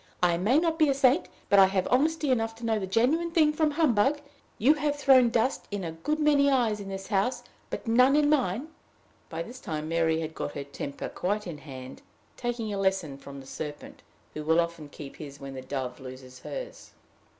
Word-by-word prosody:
I 175 -1 +4
may 205 +11 +2
not 325 0 +1
be 310 -2 +5
a 275 - +2
saint, 270 +4 +3 0.2
but 200 - +5
I 190 - +8
have 190 -1 0
honesty 300 +2 +2
enough 225 -2 0
to 230 +1 -8
know 220 -1 +1
the 190 - -4
genuine 265 - +2
thing 315 -3 +3
from 310 0 +2
humbug. 290 -3 +2 0.4
You 260 +8 +5
have 295 -1 -1
thrown 265 -4 +5
dust 235 +3 0
in 205 -2 -4
a 165 - -3
good 165 - -2
many 290 -2 +4
eyes 235 -6 +2
in 200 -1 -7
this 195 0 -6
house, 205 +5 0 0.3
but - - -5
none 250 +4 +5
in 295 -1 +4
mine." 265 - +1 0.6
By 165 0 -4
this 245 +7 -10
time 155 -7 -4
Mary 165 -1 +1
had 160 0 -5
got 145 - -4
her 140 - -4
temper 140 0 -6
quite 205 +3 -2
in 165 -5 -6
hand, 130 -2 -10 0.3
taking 240 -3 -3
a 200 - -2
lesson 190 -7 0
from 140 0 -10
the 135 - -12
serpent, 145 +2 -7 0.3
who 150 - -5
will 160 +2 +3
often 170 -3 -2
keep 145 -1 -10
his 140 -2 -9
when 135 -1 -8
the 130 - -6
dove 130 -1 -4
loses 130 -1 -10
hers. - - -8
205 Hz, 210 wpm, -28 LUFS, -, 0.6 s, I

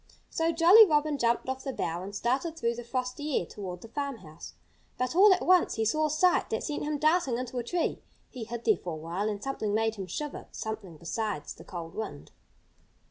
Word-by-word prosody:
So 325 0 +1
Jolly 345 +7 +8
Robin 300 -5 +2
jumped 235 +1 +1
off 265 0 -3
the 270 - -3
bough 170 -8 -3
and 200 +2 -7
started 275 +10 -1
through 235 -5 0
the 240 +1 -7
frosty 255 +4 -2
air - - -4
toward 180 -2 -7
the - - -10
farmhouse. 225 - -6 0.4
But 255 +5 -1
all 400 +3 +8
at 370 - +2
once 365 -1 +4
he 225 - 0
saw 310 +7 +2
a - - -4
sight 350 +4 +3
that 220 - -2
sent 295 - -3
him 295 0 -1
darting 310 -4 +2
into 250 0 -4
a - - -3
tree. 340 +8 -1 0.3
He 245 -4 -6
hid 235 +1 -6
there 220 -5 +4
for 175 -1 -6
a - - -4
while 170 +7 -3
and 205 0 -4
something 215 -6 -2
made 225 0 +1
him 190 -2 -5
shiver 295 - -5
something 215 -7 -6
besides 175 0 -3
the - - -14
cold 170 -2 -7
wind. 75 - -6
240 Hz, 215 wpm, -29 LUFS, 205-300 Hz, 0.4 s, Jolly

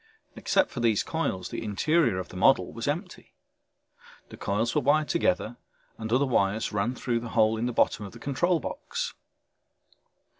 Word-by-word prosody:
Except 290 - +1
for 125 - -5
these 115 -3 +2
coils 125 - -2
the - - -5
interior 115 - +2
of 95 - -5
the - - -12
model 115 +9 +3
was 115 +2 -5
empty. 175 +6 -4 0.9
The - - -10
coils 110 +4 -1
were 150 - +2
wired 150 +1 +2
together 120 - 0 0.4
and 110 0 -5
other 130 +4 +3
wires 110 -4 0
ran 105 +4 0
out - - -13
through 120 -2 -1
the 115 0 -7
hole 110 0 +4
in 115 +2 -1
the - - -1
bottom 110 - +1
of - - -12
the 120 - -12
control 150 +7 0
box. 480 - -4
120 Hz, 180 wpm, -27 LUFS, 110-150 Hz, 0.9 s, hole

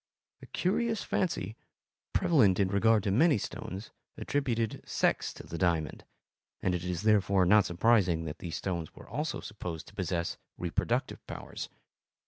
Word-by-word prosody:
A - - -11
curious 220 +4 0
fancy, 115 - -1 0.6
prevalent 110 - +4
in 95 -2 +3
regard 105 +2 +4
to 100 - +1
many 145 - +5
stones, 95 +1 -6 0.3
attributed 115 -6 -1
sex - - +1
to - - -10
the 85 - -6
diamond, 85 -5 0 0.5
and 90 - 0
it 90 -1 -2
is 90 +1 -2
therefore 100 -3 +4
not 105 +2 +5
surprising 90 -3 +3
that 75 0 -6
these 85 -2 -5
stones 85 -5 -3
were - - -12
also 150 +6 -3
supposed 90 -6 -6
to - - -19
possess 90 -3 -2 0.2
reproductive 85 -2 -1
powers. - - -6
100 Hz, 145 wpm, -30 LUFS, 90-115 Hz, 0.6 s, many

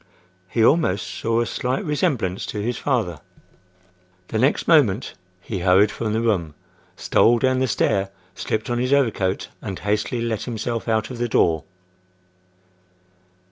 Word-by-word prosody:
He 115 +3 +2
almost 140 - +2
saw 115 +1 -1
a - - 0
slight 125 +3 -2
resemblance 140 - -1
to 105 - -4
his 120 +4 -2
father. 115 - -1 1.1
The 110 - -1
next 135 +5 +1
moment 130 - +3 0.3
he 100 0 -5
hurried 95 +3 +4
from 110 -2 -3
the 110 - 0
room; 90 -10 0 0.4
stole 120 +1 +3
down 130 +1 +1
the 130 - +1
stair; 100 -3 +1 0.2
slipped 110 +5 -3
on 120 - 0
his 125 +2 +1
overcoat, 110 -9 +1
and 95 -3 -5
hastily 105 +3 -1
let 115 -2 -2
himself 115 -1 -3
out 110 +1 0
of 125 - -7
the 120 0 -1
door. 80 -6 +2
115 Hz, 145 wpm, -22 LUFS, 100-125 Hz, 1.1 s, hurried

